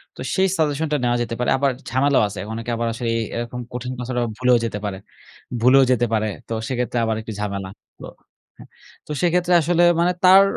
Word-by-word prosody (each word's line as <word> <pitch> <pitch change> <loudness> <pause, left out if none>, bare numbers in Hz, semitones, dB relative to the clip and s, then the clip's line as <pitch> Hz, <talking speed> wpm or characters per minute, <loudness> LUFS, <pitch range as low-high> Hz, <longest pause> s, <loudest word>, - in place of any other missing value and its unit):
তো - - -20 0.2
সেই 190 0 +3
সাজেশনটা 150 -1 0
নেওয়া 120 0 +2
যেতে 115 -1 -3
পারে। 125 - 0
আবার 140 0 +2 0.2
ঝামেলাও 135 +2 +3
আছে। 100 -1 -8
অনেকে 115 +1 -5
আবার 115 0 -1
আসলে 115 0 -3
এ - - 0
এরকম 120 +1 -4
কঠিন 125 +1 -4
পাসওয়ার্ড 125 0 -3
আবার 120 -2 -2
ভুলেও 125 -1 +4
যেতে 105 -2 -4
পারে 100 -2 -3 0.6
ভুলেও 130 +3 +6
যেতে 120 -1 +2
পারে। 110 -1 +1 0.2
তো - - -4
সেইক্ষেত্রে 125 -1 -2
আবার 110 0 0
একটু 110 - -8
ঝামেলা। 100 -2 -3 0.3
তো - - -7 0.5
হ্যাঁ, - - -14 0.4
তো - - -6
সেইক্ষেত্রে 180 0 +2
আসলে 175 +2 +2 0.2
মানে 175 +1 +3
তার 190 +1 +8
125 Hz, 200 wpm, -21 LUFS, 115-150 Hz, 0.6 s, তার